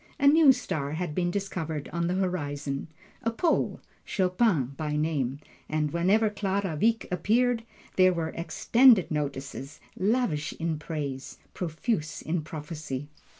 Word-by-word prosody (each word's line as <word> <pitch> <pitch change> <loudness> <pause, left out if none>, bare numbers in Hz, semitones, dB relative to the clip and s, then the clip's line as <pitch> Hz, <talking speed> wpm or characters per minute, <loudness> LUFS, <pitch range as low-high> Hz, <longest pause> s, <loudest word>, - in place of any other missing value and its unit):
A - - +1
new 295 0 +8
star 150 - -2
had 170 -1 -3
been 175 +2 0
discovered 170 -6 -3
on 170 0 0
the 180 - 0
horizon 145 -7 -2 0.3
a 230 - 0
Pole, 315 +9 +1 0.2
Chopin 180 - +1
by 150 0 -2
name. 150 -4 0 0.3
And 150 -1 0
whenever 200 +6 +3
Clara 195 -4 -1
Wieck 225 +7 +2
appeared, 230 +5 +2 0.3
there 185 0 +6
were 165 -2 -2
extended 190 +7 +4
notices, 140 -1 -4 0.2
lavish 190 -7 0
in 160 -2 -2
praise, 145 -4 -5 0.2
profuse 160 -1 -2
in 165 +1 -1
prophecy. 150 -2 -6
170 Hz, 130 wpm, -28 LUFS, 150-200 Hz, 0.3 s, new